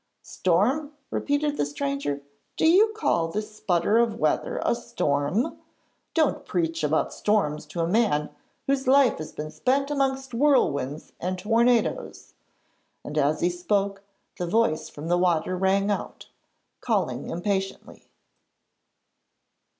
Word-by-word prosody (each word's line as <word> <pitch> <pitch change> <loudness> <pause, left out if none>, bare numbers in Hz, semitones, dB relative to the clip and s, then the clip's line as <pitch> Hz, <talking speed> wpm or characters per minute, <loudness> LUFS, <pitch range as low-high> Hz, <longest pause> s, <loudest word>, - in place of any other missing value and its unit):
'Storm!' 250 - +1 0.2
repeated 290 0 0
the - - +1
stranger. 275 - -3 0.4
'Do - - +3
you 380 +7 +6
call 170 - +1
this 210 +4 -5
sputter 185 +5 +2
of 230 -2 +1
weather 155 - 0
a - - +3
storm? 145 - -1 0.6
Don't 315 -4 +2
preach 165 -2 -1
about 150 +1 +1
storms 195 -8 0
to 170 - -4
a 165 - +1
man 175 -8 +1 0.3
whose 270 -1 0
life 270 -1 +5
has 155 - -6
been 155 0 -6
spent 270 - 0
amongst 270 -2 -1
whirlwinds 155 - +1
and 185 +1 -2
tornadoes,' 230 +4 +1 0.7
and 150 - -7
as 150 0 +1
he 175 - +3
spoke, 195 +2 -1 0.4
the 175 - -2
voice 175 -5 +1
from 150 +2 -8
the 175 +1 +2
water 175 0 +1
rang 195 +2 +2
out, 205 - -5 0.5
calling 185 - -1
impatiently. 195 +2 -3
195 Hz, 125 wpm, -25 LUFS, 165-255 Hz, 0.7 s, you